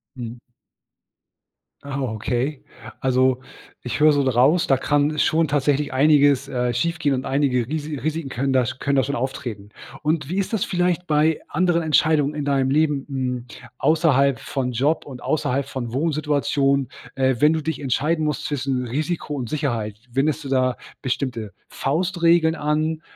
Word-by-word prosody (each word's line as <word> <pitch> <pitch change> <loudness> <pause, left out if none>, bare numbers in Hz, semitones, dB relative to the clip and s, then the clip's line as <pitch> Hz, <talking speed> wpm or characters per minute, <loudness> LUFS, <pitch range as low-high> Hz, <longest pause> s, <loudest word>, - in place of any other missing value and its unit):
Mhm. 120 -1 -7 1.4
Ah, 140 -1 -4
okay. 125 +4 -2 0.4
Also, 130 0 +2 0.4
ich 125 +3 -4
höre 155 0 +6
so 145 - +2
raus, 135 +6 +3
da 135 - +4
kann 145 +2 +1
schon 160 +1 +2
tatsächlich 145 0 +1
einiges, 140 -1 +4
äh, 125 -2 -1
schiefgehen 160 0 0
und 130 +1 -4
einige 135 -4 +1
Risi 150 +1 -3
Risiken 155 +2 -3
können 135 +1 -1
da 130 -2 +3
sch 130 - -5
können 140 +1 0
da 135 - +4
schon 140 +3 -2
auftreten. 120 -5 -4 0.3
Und 150 -2 0
wie 185 - -2
ist 195 +3 -1
das 220 - +1
vielleicht 180 -1 0
bei 155 +1 +2
anderen 175 -2 +1
Entscheidungen 150 -1 +2
in 145 -1 -3
deinem 135 -2 +1
Leben, 150 -1 +1
hm, 125 -3 -3 0.3
außerhalb 140 -4 +3
von 125 -2 -3
Job 145 +7 +1
und 130 -3 -9
außerhalb 140 -3 0
von 130 -4 -5
Wohnsituation, 140 -2 +1 0.3
äh, 130 -2 +1
wenn 150 +3 +5
du 160 - -1
dich 160 -1 -3
entscheiden 150 +4 0
musst 150 -2 -2
zwischen 135 -3 -1
Risiko 150 +5 -3
und 125 -5 -4
Sicherheit? 115 -8 -2
Wendest 150 +4 0
du 135 - -6
da 130 -2 +1 0.2
bestimmte 120 -5 -3 0.2
Faustregeln 170 +1 +2
an, 155 +1 -1
140 Hz, 160 wpm, -22 LUFS, 130-155 Hz, 1.4 s, höre